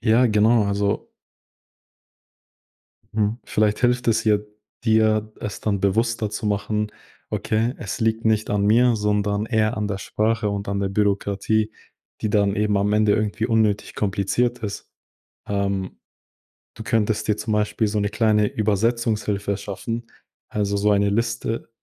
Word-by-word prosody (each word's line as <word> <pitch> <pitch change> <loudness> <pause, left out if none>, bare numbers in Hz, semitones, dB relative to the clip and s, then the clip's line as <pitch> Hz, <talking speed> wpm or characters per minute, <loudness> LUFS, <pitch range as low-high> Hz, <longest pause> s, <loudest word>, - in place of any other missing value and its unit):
Ja 115 +2 +4
genau, 110 0 +4
also 100 0 -1 2.0
Mhm, 105 +1 0
vielleicht 105 0 +1
hilft 125 0 +2
es 110 -1 +3
hier 105 -2 +2 0.4
dir, 110 -1 +2
es 105 - -5
dann 100 -3 -1
bewusster 110 +2 +1
zu 105 +1 -4
machen: 105 +1 -1 0.4
„Okay, 115 +3 0
es 110 +2 -5
liegt 115 0 0
nicht 110 -1 +1
an 105 -1 +1
mir, 120 +2 +4
sondern 105 0 0
eher 110 0 +1
an 105 -1 -1
der 100 -1 -3
Sprache 110 +2 0
und 100 0 -4
an 100 0 -1
der 100 - 0
Bürokratie, 100 +2 0 0.5
die 110 - -1
dann 100 -1 +2
eben 105 0 +1
am 100 +1 +1
Ende 105 0 +3
irgendwie 110 +1 -1
unnötig 110 -3 +1
kompliziert 110 +5 0
ist.“ 100 -2 -6 0.6
Ähm, 100 -2 -2 0.8
du 110 - -8
könntest 110 -3 0
dir 105 - +1
zum 105 +1 -2
Beispiel 105 +1 +1
so 105 +1 -1
’ne 100 0 0
kleine 105 -1 +2
Übersetzungshilfe 105 -1 0
schaffen, 115 +3 -5 0.4
also 100 -1 -1
so 105 +1 +2
eine 100 0 +3
Liste. 115 +2 -2
105 Hz, 145 wpm, -23 LUFS, 100-110 Hz, 2.0 s, Ja